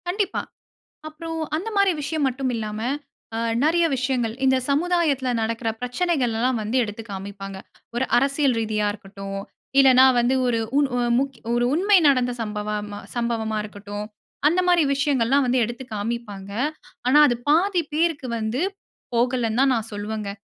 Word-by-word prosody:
கண்டிப்பா. 390 +2 -1 0.7
அப்புறம் 325 +1 -6 0.2
அந்த 370 +8 -3
மாரி 400 -1 +4
விஷயம் 295 0 -1
மட்டும் 260 0 -2
இல்லாம, 215 -1 -4 0.6
அ - - -2 0.3
நிறைய 335 +2 +3
விஷயங்கள் 255 -3 -1
இந்த 265 0 +4
சமுதாயத்தில 300 -3 +1
நடக்கிற 230 +1 -1
பிரச்சனைகள் 250 0 0
எல்லாம் 245 +1 +1
வந்து 215 +4 -1
எடுத்து 215 0 -6
காமிப்பாங்க. 195 0 -7 0.4
ஒரு 250 +2 +1
அரசியல் 275 0 +2
ரீதியா 215 -1 0
இருக்கட்டும், 195 -1 -7 0.4
இல்லைன்னா 260 -1 +7
வந்து 240 +2 +2
ஒரு 235 -2 +1 0.2
உண் 285 -2 +3 0.6
ஒரு 240 0 +2
உண்மை 390 +5 +4
நடந்த 255 -3 +3
சம்பவ 210 -1 -4 0.5
சம்பவமா 230 -2 -1
இருக்கட்டும், 205 0 -7 0.4
அந்த 340 +4 +3
மாரி 350 -2 +5
விஷயங்கள்லாம் 275 -1 +2
வந்து 250 +1 +2
எடுத்து 240 +3 -6
காமிப்பாங்க. 205 -2 -5 0.6
ஆனா 280 +4 +6
அது 240 - +1
பாதி 355 +4 +3
பேருக்கு 315 -4 0
வந்து 225 +5 -2 0.5
போகலன்னு 240 -1 +1
தான் 270 0 +4
நான் 225 -1 -3
சொல்லுவேங்க. 210 0 -4
250 Hz, 140 wpm, -23 LUFS, 220-290 Hz, 0.7 s, இல்லைன்னா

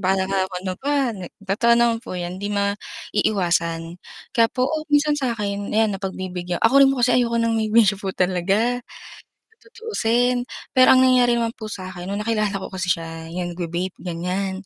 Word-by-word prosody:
baka 190 0 +1
nga 195 0 -1
ano 185 0 -4
pa, 275 -3 0
nek" 185 -5 -9 0.2
Totoo 235 +4 +3
naman 235 -1 +3
po 230 -6 -7
'yon, 180 +1 -5
'di 205 - -3
maiiwasan, 180 -4 -1 0.3
kaya 230 -3 +4
po, 250 +2 -1
oh, 310 +3 -3
minsan 295 0 +3
sa 245 -4 -1
akin, 205 -1 -3
ayan 220 -1 +2
napagbibigyan 185 -2 -4
ako 265 +5 +6
rin 275 - +7
po 265 -3 +2
kasi 250 - +2
ayoko 235 -1 0
ng 230 0 +1
may 220 -1 0
bisyo 210 -3 +4
po 195 - -4
talaga, 195 +7 +1 0.7
sa - - -37
tutuusin. 245 - 0 0.2
Pero 255 0 +6
ang - - +5
nangyari 250 -2 +4
naman 230 0 -1
po 215 -1 -8
sa'kin 185 -2 -7
no'ng 205 +1 -3
nakilala 215 -3 0
ko 195 - -8
kasi 185 -1 -3
siya, 165 -1 -3
'yung 175 +1 -4
nagva 170 -1 -5
vape 180 +2 -3
ganiyan, 185 +3 -3
205 Hz, 190 wpm, -22 LUFS, 185-235 Hz, 0.7 s, rin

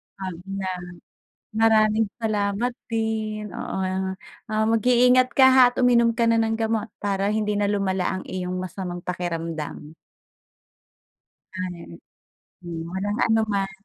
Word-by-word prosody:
Ab 190 -2 -5
nam 190 -2 -4 0.7
maraming 220 -1 +3
salamat 215 +1 -1 0.2
din. 220 -1 -2
Oo, - - -5
ah, 190 0 -2 0.3
ah, 215 0 +1
mag-iingat 250 +3 +4
ka, 265 - +8
ha, 260 - +8
at 245 - -16
uminom 235 -2 +4
ka 235 - +3
na 230 0 +3
ng 225 0 0
gamot 225 -1 -1
para 200 0 -1
hindi 210 -1 0
na 205 0 +1
lumala 190 -2 0
ang - - -7
iyong 185 0 -4
masamang 180 -1 -5
pakiramdam. 165 -3 -4 1.7
Ay. 180 -2 -5 0.8
Hmm, 170 -2 -6
walang 205 +3 -2
anuman. 215 -3 +1
205 Hz, 125 wpm, -24 LUFS, 185-225 Hz, 1.7 s, ka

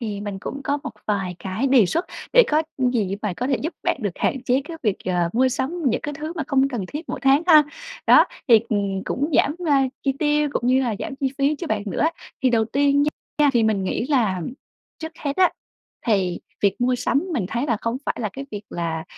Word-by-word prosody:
thì 210 -4 -4
mình 205 -1 -5
cũng 275 +7 -6
có 285 +1 0
một 290 - -5 0.2
vài 195 -4 -1
cái 190 +8 -2
đề 260 -6 +5
xuất, 335 - -1 0.3
để - - +8
có 310 +1 +3 0.2
gì 245 -7 +1
á - - -2
mà - - -2
có 250 - -2
thể 270 -1 +2
giúp 320 - -3
bạn - - +1
được 205 - 0
hạn 265 - -1
chế 255 +1 +2
cái 330 +2 -7
việc, 210 -6 +1
ờ, 180 -2 +1
mua 260 +3 +3
sắm 280 +7 -3
những 245 - +2
cái 295 - -5
thứ 310 +3 -5
mà 320 - -1
không 275 -1 +2
cần 240 -7 -3
thiết 300 +3 -6
mỗi - - -4
tháng 275 +3 +4
ha. 310 -4 +8 0.4
Đó, - - +8 0.2
thì, 230 -3 +8
ừm, 200 -2 -1
cũng 290 +5 -1
giảm, 295 - +3
a, 275 -2 +4 0.2
chi 270 - +1
tiêu 295 -1 +2
cũng 240 - -1
như 260 +1 +4
là 235 -4 0
giảm - - -5
chi 270 -1 -1
phí 280 +2 +2
cho 345 - -5
bạn 205 - -1
nữa 200 - -3
á. 320 - +3 0.3
Thì 260 - +4
đầu 225 -2 +3
tiên 280 +4 +2
nha 300 - +2 0.3
nha 295 -1 +5
thì 235 -3 +3
mình 215 -3 +1
nghĩ 230 +6 -1
là, 245 -10 +2
ờm, 180 +4 -5 0.5
trước 320 0 -6
hết 285 -1 -3
á, 370 -1 +5 0.6
thì 190 -5 +1 0.2
việc 200 +2 +1
mua 250 +1 +2
sắm 275 +5 0
mình 225 - -1
thấy 240 +6 -2
là 235 -5 +1
không 230 +1 -1
phải - - -1
là 215 - -1
cái 275 +1 -7
việc 205 -1 -6
là 165 -2 -3
255 Hz, 250 wpm, -23 LUFS, 210-285 Hz, 0.6 s, để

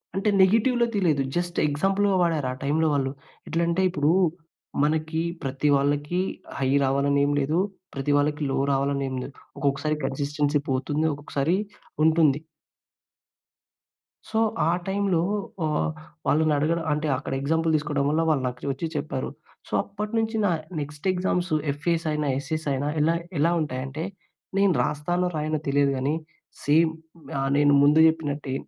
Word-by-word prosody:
అంటే 195 +2 +1
నెగెటివ్‌లో 230 +5 +4
తెలీదు. 165 -8 +2
జస్ట్ 175 0 -2
ఎగ్జాంపుల్‌గా 195 +7 +1
వాడారు. 160 -6 +1
ఆ - - -7
టైమ్‌లో 155 +3 +2
వాళ్ళు, 135 -2 0 0.4
ఎట్లంటే 170 +2 +1
ఇప్పుడు 150 -3 +1 0.7
మనకి 155 +1 0 0.2
ప్రతి 135 +2 -1
వాళ్ళకి 145 +5 0 0.4
హై 135 -1 +1 0.2
రావాలని 140 +1 +2
ఏమి 145 0 +1
లేదు, 155 +5 +1 0.3
ప్రతి 135 +1 -1
వాళ్ళకి 150 +1 0
లో 135 - 0
రావాలని 140 0 0
ఏమి 130 -1 -3
లేదు. 140 - -9 0.2
ఒక్కొక్కసారి 140 +2 0
కన్‌సిస్టెన్సీ 145 +2 0
పోతుంది. 140 +4 0
ఒక్కొక్కసారి 145 +3 -1 0.5
ఉంటుంది. 155 -3 +4 1.9
సో, 220 - 0 0.3
ఆ - - +4 0.2
టైమ్‌లో 190 -3 +1 0.4
ఆహ్, 155 +1 0 0.4
వాళ్ళని 155 0 +3
అడగడం 160 +3 0
అంటే 150 +1 -1
అక్కడ 135 - -5
ఎగ్జాంపుల్ 160 +3 +1
తీసుకోవడం 145 -2 0
వల్ల 155 +2 +2
వాళ్ళు 145 -4 +2
నాకు 125 +2 -6
వచ్చి 135 +5 -3
చెప్పారు. 145 -3 -3 0.4
సో, - - -12
అప్పటినుంచి 220 +2 -2
నా 190 - +3 0.3
నెక్స్ట్ 150 +4 -5
ఎగ్జామ్స్ 180 0 -1 0.2
ఎఫ్ఏఎస్ 165 +3 -1
అయినా 150 -1 -1
ఎస్ఏఎస్ 155 +3 -4
అయినా 135 +2 -1
ఎలా 160 +2 +3 0.3
ఎలా 165 +3 +3
ఉంటాయంటే, 135 +1 -4 0.5
నేను 195 -2 +4
రాస్తానో, 175 +6 -1
రాయనో 155 0 -1
తెలియదు 140 0 +3
గానీ 135 +4 0 0.5
సేమ్ 160 +3 +4 0.5
ఆహ్, 135 0 0
నేను 145 0 +5
ముందు 150 +2 +5
చెప్పినట్టే 150 -4 -2
150 Hz, 140 wpm, -25 LUFS, 140-170 Hz, 1.9 s, నేను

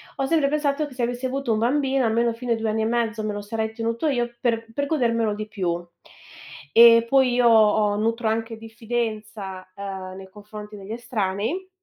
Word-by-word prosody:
ho 270 - -1
sempre 305 0 +2
pensato, 295 0 0
che 270 - -13
se 250 - -2
avessi 245 +2 -2
avuto 265 -2 -1
un 215 - 0
bambino, 265 +2 +1
almeno 230 +1 +1
fino 240 +1 -5
ai 225 - -1
2 225 0 -2
anni 220 +1 0
e - - +1
mezzo 225 -1 -1
me 215 -1 -2
lo 205 - -4
sarei 220 +1 -3
tenuto 230 +5 -2
io, 240 -4 0
per 230 -2 0
per 285 +4 -1
godermelo 230 -7 +1
di 215 0 -5
più. 175 -4 -3 0.9
E 230 0 +8
poi 265 0 +3
io 245 -1 +4
ho 215 -2 +4
nutro 230 +2 0
anche 225 +1 -2
diffidenza, 220 -4 -5
ehm, 190 -2 -6
nei 190 0 -11
confronti 210 +1 -10
degli 200 0 -9
estranei 230 - -3
225 Hz, 195 wpm, -23 LUFS, 215-245 Hz, 0.9 s, E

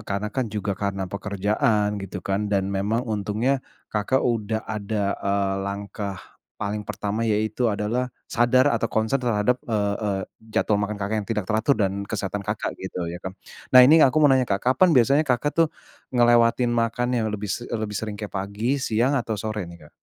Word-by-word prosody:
karena 100 +1 -2
kan 125 -4 -1
juga 105 -1 -2
karena 95 0 -2
pekerjaan 105 +1 0
gitu 95 -1 -7
kan, 100 +2 -1
dan 100 -1 0
memang 105 +5 0
untungnya 110 +5 0 0.3
Kakak 110 +5 +1
udah 110 -2 -1
ada, 105 -1 -2
eee, 100 -1 0
langkah 100 0 -4 0.4
paling 105 +1 -3
pertama 105 +2 -3
yaitu 110 +2 +1
adalah 115 +5 -1 0.2
sadar 125 +3 +3
atau 115 - 0
concern 110 +5 0
terhadap, 120 +1 +1
eee 100 -2 +1
eee, 100 -3 -1 0.4
jadwal 105 -1 +2
makan 105 +1 -2
Kakak 100 +2 -3
yang 100 - -9
tidak 105 -4 -1
teratur 110 +6 +3
dan 95 +1 -2
kesehatan 100 -1 -3
Kakak 100 - -3
gitu, 90 - -4
ya 90 - -7
kan. 95 +1 -7 0.4
Nah 125 - +11
ini 160 +5 +7
aku 135 0 +5
mau - - +9
nanya, 130 -2 +2
Kak, 100 +2 -1
kapan 175 +7 +4
biasanya 135 +5 +5
Kakak 130 +4 +1
tuh 165 -1 +3 0.5
ngelewatin 120 0 +4
makan 120 +1 0
yang 115 -3 +1
lebih 105 0 -4
se 120 - -5
e 115 - -2
lebih 110 -1 -4
sering 105 0 -4
kayak 105 -1 -7
pagi, 105 +8 -2
siang, 120 +4 +1
atau 110 -2 -3
sore 105 -4 -4
nih, 85 -3 -13
Kak? - - -17
105 Hz, 185 wpm, -24 LUFS, 100-120 Hz, 0.5 s, Nah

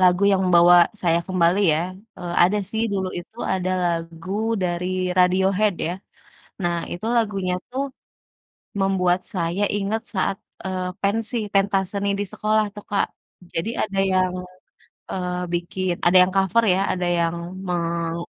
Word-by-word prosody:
lagu 180 +1 +4
yang 190 - +3
membawa 175 0 +7 0.3
saya 170 -1 +3
kembali 185 0 +2
ya, 155 - +1 0.4
eee, 175 -1 -5
ada 190 +4 +4
sih. 220 +1 -1
Dulu 190 -2 -1
itu 190 +6 -11 0.2
ada 185 -1 -1 0.3
lagu 165 +2 -10 0.3
dari 175 0 -1 0.3
Radiohead, 190 +3 +3
ya. - - -1 0.7
Nah, 175 0 +1 0.2
itu 175 +6 -5
lagunya 195 -5 0 0.2
tuh, 265 - -1 1.0
membuat 185 -2 +2
saya 175 +2 -1
inget 205 +2 -1
saat, 195 0 0 0.3
eee, 185 -1 -2
pensi, 225 +4 0 0.2
pentas 195 0 +2
seni 200 0 -1
di - - +1
sekolah 215 0 +2
tuh, 205 - -7
Kak. 200 - +2 0.5
Jadi 165 +7 -1
ada 200 -2 -1
yang, 185 -1 +2 0.8
eee, 180 -1 -2
bikin 175 +1 -1
ada 175 +2 +6
yang - - -4
cover 195 +4 +3
ya, - - 0
ada 180 -1 -1
yang 170 0 +1 0.3
meng 170 -1 -1
185 Hz, 145 wpm, -23 LUFS, 175-200 Hz, 1.0 s, membawa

